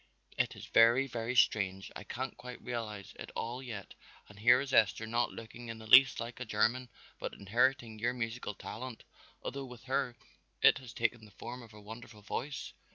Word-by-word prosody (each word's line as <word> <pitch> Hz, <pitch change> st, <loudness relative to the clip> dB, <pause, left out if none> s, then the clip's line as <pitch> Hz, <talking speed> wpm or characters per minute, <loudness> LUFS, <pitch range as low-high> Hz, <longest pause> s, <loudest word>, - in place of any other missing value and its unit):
It -, -, 0 dB
is -, -, -9 dB
very, 120 Hz, +4 st, +6 dB
very 120 Hz, -1 st, -3 dB
strange, 95 Hz, -5 st, +2 dB
I -, -, -6 dB
can't 130 Hz, +4 st, -4 dB
quite 125 Hz, 0 st, -9 dB
realize 110 Hz, -5 st, -5 dB
it -, -, -7 dB
all 120 Hz, +3 st, -3 dB
yet 110 Hz, -7 st, -7 dB, 0.3 s
and 105 Hz, 0 st, -15 dB
here 120 Hz, +3 st, +7 dB
is 135 Hz, -1 st, -4 dB
Esther 110 Hz, +1 st, +4 dB
not 120 Hz, +2 st, +1 dB
looking 115 Hz, +1 st, -9 dB
in 115 Hz, 0 st, -5 dB
the 110 Hz, -, -11 dB
least 125 Hz, +5 st, +8 dB
like 115 Hz, +1 st, -5 dB
a -, -, -2 dB
German 120 Hz, +3 st, +1 dB, 0.3 s
but -, -, -4 dB
inheriting 115 Hz, +2 st, +1 dB
your 120 Hz, +3 st, 0 dB
musical 115 Hz, -3 st, -3 dB
talent, 125 Hz, +3 st, -7 dB, 0.4 s
although 135 Hz, 0 st, -4 dB
with 125 Hz, -2 st, -11 dB
her 130 Hz, -2 st, 0 dB, 0.5 s
it -, -, +7 dB
has 125 Hz, -3 st, -10 dB
taken 120 Hz, -1 st, 0 dB
the 105 Hz, -, -13 dB
form 120 Hz, +5 st, -8 dB
of 115 Hz, -2 st, -13 dB
a -, -, -11 dB
wonderful 110 Hz, 0 st, -10 dB
voice." 135 Hz, +6 st, -4 dB
120 Hz, 190 wpm, -33 LUFS, 110-125 Hz, 0.5 s, least